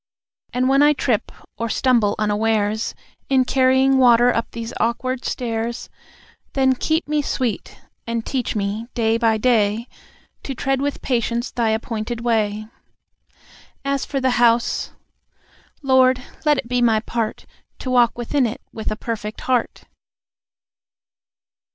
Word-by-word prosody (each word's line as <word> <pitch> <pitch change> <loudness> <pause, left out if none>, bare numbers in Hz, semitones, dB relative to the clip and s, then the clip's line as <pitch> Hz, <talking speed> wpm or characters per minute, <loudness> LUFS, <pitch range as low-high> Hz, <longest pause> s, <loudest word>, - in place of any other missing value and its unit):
And 255 +1 0
when 275 +1 +4
I 295 +1 +6
trip, 245 -6 -1 0.3
or 230 0 -2
stumble 235 -5 +2
unawares 215 0 0 0.3
In 260 -2 +3
carrying 265 +1 +3
water 245 -1 +5
up 230 - -2
these 230 0 -6
awkward 255 +2 -1
stairs, 235 -1 -3 0.6
Then 265 -1 +3
keep 315 +5 -1
me 300 0 +1
sweet, 255 -5 -3 0.3
and 230 -1 -2
teach 255 -4 -2
me 210 +2 -2
day 225 -1 +1
by 225 -2 +3
day 220 -1 +1 0.5
To 270 - -5
tread 270 +1 -1
with 285 0 -3
patience 235 -1 -1
Thy 235 -2 0
appointed 225 +1 -3
way. 215 -3 0 1.2
As 275 -1 0
for 275 - -2
the 260 -1 +1
house.... 235 0 +2 0.9
Lord, 260 -1 +4 0.2
let 300 -1 +4
it 235 - -4
be 250 0 0
my 225 -2 +4
part 230 -1 -3 0.3
To 255 - -5
walk 240 -2 +3
within 245 +2 +1
it 225 - -6
with 220 - -4
a 215 - -2
perfect 215 -1 -5
heart." 250 -2 -1
240 Hz, 135 wpm, -21 LUFS, 225-260 Hz, 1.2 s, I